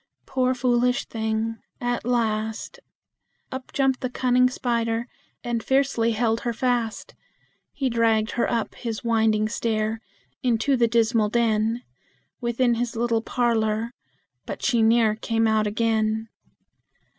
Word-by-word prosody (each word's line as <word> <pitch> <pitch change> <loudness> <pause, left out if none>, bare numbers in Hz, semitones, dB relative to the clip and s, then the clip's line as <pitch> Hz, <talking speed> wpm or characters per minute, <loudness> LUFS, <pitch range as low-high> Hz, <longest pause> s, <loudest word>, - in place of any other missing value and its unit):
Poor, 255 -1 +1
foolish 250 +1 +1
thing! 220 0 -2 0.2
at 245 0 -1
last 225 - -1 0.7
Up 260 0 -7
jumped 270 -2 +1
the 255 - -1
cunning 250 0 +3
spider, 235 -2 -1 0.4
and 240 -1 -1
fiercely 265 -4 +2
held 225 0 +1
her 235 0 -2
fast; 240 -2 -1 0.6
He 270 - -2
dragged 225 -2 +2
her 240 - 0
up 230 -2 -1
his 230 -2 -5
winding 220 -2 +2
stair, 220 0 -1 0.4
into 250 +1 +2
the 240 -2 +3
dismal 225 -2 +2
den 225 +1 +1 0.6
Within 240 0 +1
his 240 +1 -2
little 230 -1 +1
parlor 225 -1 0 0.6
but - - -6
she 240 -4 +2
ne'er 225 -1 +4
came 225 +1 0
out 215 -1 +2
again! 220 0 0
230 Hz, 125 wpm, -24 LUFS, 220-245 Hz, 0.7 s, ne'er